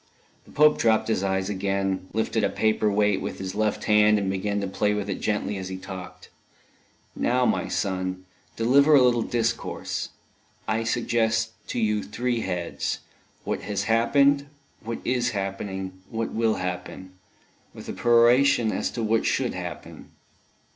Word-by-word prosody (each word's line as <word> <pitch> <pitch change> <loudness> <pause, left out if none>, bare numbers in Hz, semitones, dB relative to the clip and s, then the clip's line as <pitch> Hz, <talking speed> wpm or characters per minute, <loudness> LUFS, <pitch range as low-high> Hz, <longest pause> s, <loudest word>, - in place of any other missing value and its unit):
The - - -17
Pope 150 0 +4
dropped 110 0 +2
his 110 - +1
eyes 95 -1 0
again, 95 -1 -1
lifted 110 0 -1
a - - +2
paper 110 -1 +1
weight 105 -1 +2
with - - -5
his 95 -1 -5
left 105 0 -1
hand, 105 0 +5
and 100 -2 -1
began 100 +2 -1
to 100 - -2
play 105 +2 0
with 105 -1 -3
it - - -5
gently 105 -1 -1
as 95 -1 -5
he 95 - -5
talked. 95 -1 -9 0.8
"Now, 125 +1 +1
my - - 0
son, 95 -1 -2 0.3
deliver 140 +6 +5
a 140 - +7
little 120 -2 +3
discourse. 120 0 -2 0.6
I 110 +1 0
suggest 115 -1 +1 0.2
to - - -3
you 105 -2 +1
three 120 +3 -2
heads 90 -5 -3 0.4
what - - -3
has 100 -1 -2
happened, 140 +6 +3 0.4
what 115 +1 -4
is 125 -2 0
happening, 95 -1 -5
what 115 0 -3
will 115 -1 +1
happen, 90 +1 -5 0.6
with - - -10
a - - -4
peroration 120 0 +4
as - - -1
to 115 - -3
what 110 +1 +1
should - - 0
happen." - - -8
105 Hz, 155 wpm, -25 LUFS, 95-115 Hz, 0.8 s, a